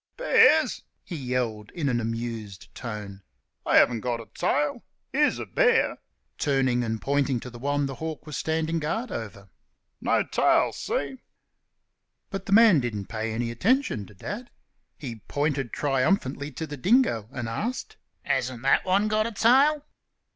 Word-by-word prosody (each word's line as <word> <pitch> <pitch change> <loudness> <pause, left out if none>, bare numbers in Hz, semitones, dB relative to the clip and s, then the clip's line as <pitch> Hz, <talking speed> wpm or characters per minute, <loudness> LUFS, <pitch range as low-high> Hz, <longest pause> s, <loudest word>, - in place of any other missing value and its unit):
"Bears?" - - +4 0.2
he 175 - -7
yelled, 125 -6 -2
in 160 -5 -1
an 120 -3 +1
amused 115 -4 -5
tone, 105 -5 -7 0.4
"they - - -1
haven't 120 -2 +5
got 120 0 -2
a 115 - -8
tail.... 150 +11 0 0.3
Here's 295 +2 +3
a - - -5
bear!" 470 -2 +2 0.4
turning 130 -4 +1
and 110 -1 -2
pointing 140 -2 0
to 125 - -8
the 120 - -10
one 145 +2 0
the 135 - -4
hawk 160 +3 -6
was 150 -2 -6
standing 160 +1 -1
guard 220 +10 -2
over 100 - -6 0.5
"no - - +2
tail - - +2
see?" 135 -2 -3 1.1
But 195 0 -5
the - - -4
man 215 -6 +7
didn't 105 -6 -4
pay 110 0 -3
any 115 +1 -2
attention 180 - +1
to 105 - -16
Dad. 230 - -6 0.5
He 120 -7 -7
pointed 145 -4 -1
triumphantly 140 0 0
to 160 - -4
the 145 -1 -7
dingo 155 - +2
and 120 -3 -4
asked, 220 - -4 0.3
"Hasn't 125 -2 -1
that 135 - +4
one 195 +3 +2
got 215 +1 +1
a - - -5
tail?" 275 +7 +4
135 Hz, 155 wpm, -26 LUFS, 115-190 Hz, 1.1 s, man